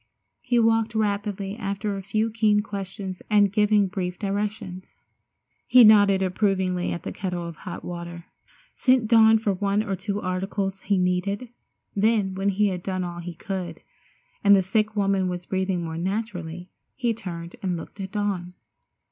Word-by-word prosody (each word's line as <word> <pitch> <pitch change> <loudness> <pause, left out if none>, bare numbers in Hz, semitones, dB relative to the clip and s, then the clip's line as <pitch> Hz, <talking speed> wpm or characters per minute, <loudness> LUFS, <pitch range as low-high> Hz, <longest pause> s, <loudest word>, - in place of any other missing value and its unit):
He 245 -1 0
walked 225 -1 +2
rapidly 205 -2 -1
asking 200 -1 -3
a 195 -1 -3
few 215 +4 -1
keen 215 -2 +3
questions 195 -2 -6
and 205 -2 +4
giving 210 -1 +4
brief 180 -2 -3
directions. 200 -2 -4 0.7
He 250 -1 +8
nodded 205 -3 +6
approvingly 185 -1 0
at 170 - -5
the - - -4
kettle 180 -3 -4
of 170 - -7
hot 175 - -8
water, 170 -1 -7 0.5
sent 255 -3 +3
Dawn 225 -1 +6
for 215 -2 0
one 200 +2 0
or 195 -3 -2
two 200 +2 -3
articles 195 +1 -2
he 200 0 +1
needed, 185 +6 0 0.5
then 205 -2 +2
when 195 +1 0
he 205 +1 +2
had 180 -2 -4
done 185 0 -2
all 175 -1 -5
he 175 0 -7
could, 175 -2 -5 0.6
and 200 0 +7
the 190 - +3
sick 215 +3 0
woman 195 -2 +1
was 180 0 -5
breathing 190 -2 -1
more 165 0 -4
naturally, 180 -3 -4 0.2
he 240 -2 0
turned 175 -6 -7
and 185 -3 -1
looked 165 - -10
at 190 +2 -6
Dawn. 195 -4 -2
195 Hz, 165 wpm, -25 LUFS, 180-210 Hz, 0.7 s, He